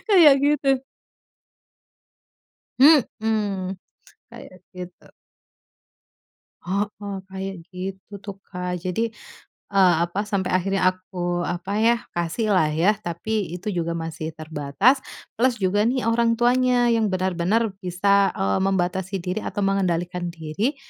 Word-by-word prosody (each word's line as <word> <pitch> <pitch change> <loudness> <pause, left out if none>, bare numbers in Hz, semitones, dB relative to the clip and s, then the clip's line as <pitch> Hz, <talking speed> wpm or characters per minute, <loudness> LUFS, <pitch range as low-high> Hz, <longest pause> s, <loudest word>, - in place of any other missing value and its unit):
kayak 335 -9 +8
gitu. 275 -2 +2 2.0
Mhm, 215 - +3 0.5
kayak 185 - -12 0.2
gitu. 180 -1 -9 1.6
Heeh, 200 +1 -3
kayak 190 0 -5 0.2
gitu 190 +2 -7
tuh, 200 -2 -8
Kak. 180 -1 -4
Jadi, 185 +6 -2 0.6
eee, 190 -3 +5
apa, 195 +5 -3
sampai 195 -3 -1
akhirnya 195 +1 +1
aku 180 -1 -4
apa 175 +3 -4
ya, 230 +2 +4 0.2
kasihlah 175 0 +1
ya. 165 +7 +3
Tapi 180 +1 -3
itu 205 +4 -4
juga 170 -2 -2
masih 160 -1 -5
terbatas, 155 - +1 0.4
plus 250 -1 +3
juga 205 +2 +1
nih, 255 +1 0
orang 230 0 +2
tuanya 245 0 +3
yang 225 -2 +2
benar-benar 190 +4 0
bisa, 195 +2 +2
eee, 95 0 0
membatasi 190 0 0
diri 185 +3 -2
atau 205 - -3
mengendalikan 180 -2 0
diri 170 - -2
195 Hz, 110 wpm, -23 LUFS, 175-220 Hz, 2.0 s, kayak